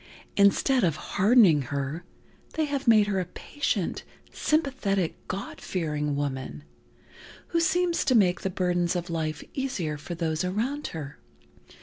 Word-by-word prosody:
Instead 215 +6 +4
of 165 -5 +2
hardening 195 - +4
her, 140 +5 -3 0.5
they 315 - +1
have 280 -2 -3
made 215 -3 +6
her 200 -2 0
a 185 - -1
patient, 205 - -3 0.3
sympathetic, 240 - 0
God 195 +2 -5
fearing 150 -5 -2
woman, 130 - -4 0.9
who 335 - +1
seems 345 +1 +2
to 255 - +3
make 185 -5 +4
the 190 - -1
burdens 175 -1 0
of 175 -1 -3
life 155 -2 -2
easier 200 - -2
for 175 +4 -6
those 160 0 -1
around 235 +11 -2
her. 150 -3 -7
185 Hz, 135 wpm, -27 LUFS, 155-245 Hz, 0.9 s, made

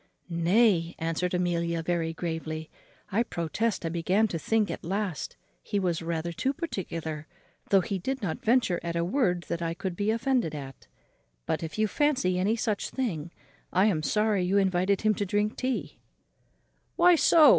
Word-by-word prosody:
"Nay," 175 0 +3
answered 165 +2 -1
Amelia 170 -2 0
very 165 -1 0
gravely, 160 -1 -4 0.4
"I 210 +5 +2
protest 205 0 -1
I - - 0
began 180 +6 +2
to 165 - -3
think 220 +3 +1
at - - -6
last 190 -4 -2 0.3
he 205 - -2
was 175 -4 0
rather 165 0 -2
too 260 +11 -1
particular, 165 - -4 0.4
though 195 -1 +5
he 195 -1 -3
did 265 +8 -2
not 185 -8 -3
venture 230 -6 +3
at 170 0 -3
a 170 0 +1
word 180 -5 +1
that 170 - -3
I 165 0 -1
could 185 0 -4
be 205 +3 0
offended 230 - +1
at; 135 -2 -9 0.6
but, - - -1
if 160 +2 -5
you 215 - +3
fancy 230 -9 +1
any 205 +5 +2
such 220 -3 -1
thing, 175 - -2 0.4
I 185 +2 +4
am 185 -8 +2
sorry 210 +3 +2
you 185 +3 +2
invited 190 0 +2
him 215 0 +3
to 205 - -2
drink 205 +2 0
tea," 255 0 -3 1.0
"Why 355 +1 +6
so?" 320 -2 +7
185 Hz, 170 wpm, -28 LUFS, 170-215 Hz, 1.0 s, so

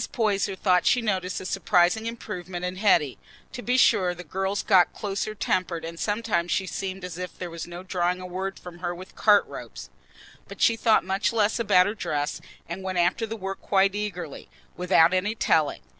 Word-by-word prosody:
Poyser 205 -4 0
thought 180 -2 +2
she 250 - +4
noticed 190 -5 -1
a - - -8
surprising 185 +3 +2
improvement 185 -6 -5
in 180 +1 -4
Hetty. 175 - +2 0.3
To 245 - -7
be 250 +1 +1
sure, 180 -7 +4
the 180 - -9
girl 190 +4 -2
got 185 -3 +5
"closer 210 0 -3
tempered, 180 -4 -1
and 165 0 -7
sometimes 205 -5 -1
she 190 - +1
seemed 190 0 -5
as 180 -1 -7
if 180 0 -6
there'd 175 -2 -6
be - - -9
no 175 +1 -8
drawing 180 -1 -1
a 185 - -7
word 190 +2 -4
from 175 -1 -11
her 175 0 -3
with 185 +2 -12
cart 210 -2 +5
ropes," - - -9 0.6
but - - -11
she 230 - +4
thought 225 -1 +3
much 190 +3 0
less 220 0 +1
about 185 -5 +4
her 205 - -1
dress, 150 -8 -3 0.3
and 170 +3 -6
went 190 -1 -3
after 175 +6 +1
the 225 +1 -5
work 195 -1 -5
quite 195 0 +2
eagerly, 185 -7 -5 0.3
without 180 -1 +4
any 200 +4 0
telling. 155 -8 +1
185 Hz, 195 wpm, -25 LUFS, 180-205 Hz, 0.6 s, got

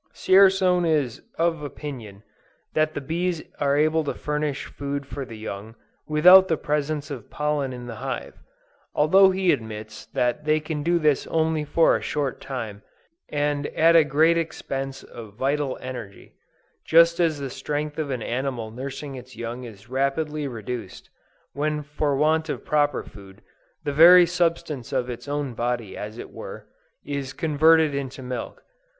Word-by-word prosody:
Dzierzon 190 -2 +4
is 150 -8 0 0.2
of 165 -1 +1
opinion 125 -9 -8 0.5
that 155 0 +1
the 145 - -3
bees 170 +3 -2 0.2
are 140 -1 +2
able 155 +1 +2
to - - -2
furnish 150 -1 -2
food 140 0 -5
for 140 -1 -6
the 115 -3 -10
young, 110 +1 -7 0.3
without 180 +5 +7
the 160 - +1
presence 150 0 -2
of 125 -6 -7
pollen 150 -2 -1
in 125 -1 -7
the 115 -2 -7
hive; - - -5 0.6
although 190 +6 +6
he 190 -1 +2
admits 110 -4 -5
that 125 +5 -1
they 155 +1 +2
can 155 -1 -4
do 170 +3 +2
this 150 -4 +1
only 160 -1 0
for 160 +2 +3
a - - -2
short 145 -4 -2
time, 115 -7 -6 0.5
and 145 0 -1
at 165 +1 +5
a 165 - +8
great 160 +4 +3
expense 135 -4 -4
of 110 -4 -11
vital 140 +2 -1
energy; 125 -6 -8 0.5
just 170 +1 +5
as 165 -3 +2
the 135 -2 -5
strength 150 +3 -4
of 150 -2 -2
an 125 -4 -3
animal 125 -3 -3
nursing 135 +4 -6
its 130 -1 -10
young 120 +2 -6
is 105 -2 -12
rapidly 140 +3 -1
reduced, 115 -4 -7 0.4
when 150 +1 -1
for 145 0 -1
want 160 +2 +2
of - - -4
proper 145 -2 +1
food, 95 -1 -14 0.4
the 145 - -2
very 175 +4 +9
substance 165 -7 -1
of 125 0 -1
its 120 - -8
own 145 -3 -2
body 120 -3 -2
as 105 +2 -7
it - - -8
were, - - -9 0.4
is 140 -2 -4
converted 160 0 +4
into 135 -1 -5
milk. 125 -2 -6
145 Hz, 160 wpm, -24 LUFS, 125-155 Hz, 0.6 s, very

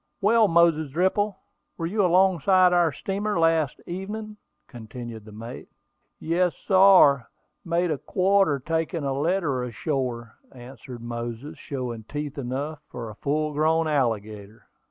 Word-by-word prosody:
"Well, 220 +1 +4
Moses 165 -3 +3
Dripple, 190 +5 0 0.4
were 165 - -3
you 200 +4 0
alongside 185 0 +4
our 175 -2 +3
steamer 200 +6 -3
last 165 -4 +2
evening?" 210 +4 -6 0.3
continued 115 -2 -9
the 110 - -12
mate. 115 +3 -9 0.5
"Yes, 175 +2 0
sar; 185 - +6 0.3
made 170 0 0
a 145 - -2
quarter 190 -5 +2
taking 160 +3 -2
a 135 -1 -1
letter 145 -3 0
ashore," 125 -3 -4
answered 125 -1 -11
Moses, 120 +3 -6
showing 125 -5 -5
teeth 145 +2 -5
enough 140 +4 -4
for 115 -3 -7
a - - -13
full 150 +6 -1
grown 160 +2 +2
alligator. 110 -6 -2
155 Hz, 130 wpm, -25 LUFS, 125-180 Hz, 0.5 s, sar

